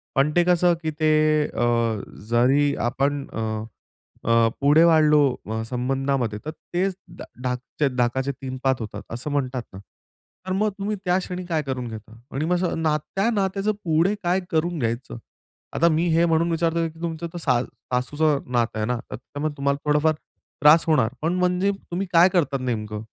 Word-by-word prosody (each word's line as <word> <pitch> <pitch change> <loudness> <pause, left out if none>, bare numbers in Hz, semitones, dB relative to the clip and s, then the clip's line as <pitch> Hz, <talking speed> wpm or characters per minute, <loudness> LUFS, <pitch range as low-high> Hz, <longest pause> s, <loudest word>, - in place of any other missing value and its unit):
पण 140 +3 +3
ते 175 - +5
कसं, 175 0 +3
की 155 - -1
ते 155 -1 +3 0.4
अ, 120 - -1 0.6
जरी 135 +5 +3
आपण 140 +2 -1
अ, - - -4 0.8
अ, 115 0 +4
पुढे 145 +3 +6
वाढलो 155 -2 +5 0.3
अ, 110 0 -2
संबंधामध्ये, 130 -3 -1
तर 155 - -3
तेच 185 +3 -3 0.2
डा - - -7 0.2
ढाकचे 125 +3 -1
ढाकाचे 130 +3 0
3-5 130 0 -1
होतात, 110 - -6
असं 125 +5 -4
म्हणतात 130 -3 -1
ना? 95 - -8 0.7
तर - - -2
मग 215 +3 +1
तुम्ही 205 +1 -2
त्या 180 +1 +3
क्षणी 180 -1 -5
काय 165 -3 0
करून 130 -3 -4
घेता? 110 0 -10
आणि 140 +3 -2
मग 180 +2 +1
अस 175 - -1
नात्या 160 +7 0
नात्याचं 195 0 0
पुढे 165 +4 +2
काय 180 +2 +2
करून 170 +1 0
घ्यायचं? 115 +1 -3 0.6
आता 170 - +3
मी 165 +2 +1
हे 170 - +4
म्हणून 165 0 +2
विचारतोय, 165 0 0
की 160 +1 -17
तुमचं 170 0 -3
तर - - -5
सा 130 -7 +2
सासूचं 145 +5 -1
नातं 120 -2 +1
आहे 105 - 0
ना, 125 - 0
तर - - -3
त्यामुळे 145 +4 -5
तुम्हाला 140 0 0
थोडाफार 150 +1 +3 0.5
त्रास 150 +3 +7
होणार, 145 -8 +3
पण 165 +3 0
म्हणजे 180 +2 +2 0.2
तुम्ही 190 +3 -2
काय 175 +2 +7
करतात 155 -6 +1
नेमकं? 110 -4 -3
150 Hz, 170 wpm, -23 LUFS, 130-170 Hz, 0.8 s, त्रास